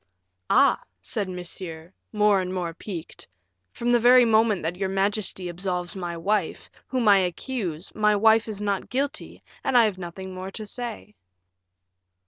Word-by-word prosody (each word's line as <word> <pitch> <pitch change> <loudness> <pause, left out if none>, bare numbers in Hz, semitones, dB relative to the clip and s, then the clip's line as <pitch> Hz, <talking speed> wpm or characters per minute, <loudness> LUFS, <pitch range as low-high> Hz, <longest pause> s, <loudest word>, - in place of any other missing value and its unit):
"Ah!" - - +4 0.2
said 185 - -4
Monsieur, 175 -1 -7 0.2
more 210 -2 +3
and 185 0 -4
more 175 -3 -3
piqued, 170 -1 -8 0.4
"from 240 +1 -1
the 240 - +5
very 245 +1 +7
moment 220 -4 +3
that 165 +2 -2
your 190 +1 -2
majesty 195 -1 -1
absolves 180 +1 -3
my 175 -2 -4
wife, 195 0 -1 0.2
whom 255 -4 0
I 200 -1 +7
accuse, 180 -2 -3
my 210 -1 +3
wife 220 +2 +4
is 210 -2 -5
not 200 -2 -2
guilty, 275 +3 -3 0.2
and 250 - +2
I 235 - +7
have 200 -4 -2
nothing 185 +2 -7
more 185 +1 -6
to 215 +2 -6
say." 230 -1 -6
195 Hz, 155 wpm, -25 LUFS, 180-220 Hz, 0.4 s, very